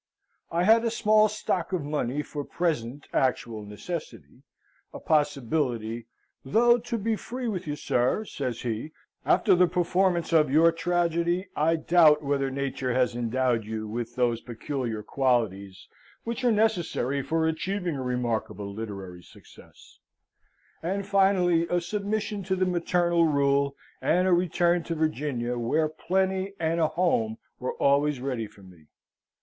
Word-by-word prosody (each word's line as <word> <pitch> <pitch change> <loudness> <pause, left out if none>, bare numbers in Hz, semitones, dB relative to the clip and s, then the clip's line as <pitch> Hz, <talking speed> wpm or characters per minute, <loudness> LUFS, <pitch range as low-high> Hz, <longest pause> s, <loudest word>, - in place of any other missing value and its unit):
I 170 +1 +1
had 225 +4 +5
a 230 - +1
small 215 -1 +3
stock 190 -4 -2
of 175 -5 0
money 145 -1 -2
for 145 -1 -5
present 145 -6 -2
actual 120 -4 0
necessity 105 - -7 0.5
a - - -8
possibility, 125 -6 0 0.4
"though, 235 - +4
to 235 0 -3
be 225 +1 0
free 250 +3 -5
with 185 -6 -3
you, 145 - -2
sir" 130 - 0
(says 130 - -4
he), 120 +6 -4 0.3
"after - - +4
the 180 0 +5
performance 175 0 +1
of 155 -3 +4
your 160 +4 +5
tragedy, 175 +2 0
I 160 +2 +2
doubt 155 -2 +4
whether 140 -1 0
nature 135 -1 -2
has 125 -2 +1
endowed 120 0 0
you 110 0 -5
with 120 +2 -5
those 120 -2 +1
peculiar 120 -2 -4
qualities 105 -9 -1 0.4
which 235 +2 -4
are 245 - +4
necessary 175 - 0
for 160 +3 0
achieving 175 +1 -2
a 135 - -4
remarkable 115 -5 -2
literary 100 -5 -7
success" - - -18 0.8
and 195 +4 -2
finally 190 -4 +3
a 175 - +1
submission 205 +2 -3
to 190 +1 0
the 185 0 +1
maternal 175 -1 +2
rule, 140 -1 +2 0.3
and 180 +2 +2
a 185 - +4
return 175 0 +2
to 165 - -3
Virginia, 140 -6 -1
where 155 +7 +1
plenty 190 +4 -1
and 165 +1 0
a 160 - +3
home 155 -10 0 0.2
were 130 - -3
always 140 0 +2
ready 125 -4 -3
for 100 - -19
me. 90 -5 -17
155 Hz, 145 wpm, -27 LUFS, 125-180 Hz, 0.8 s, had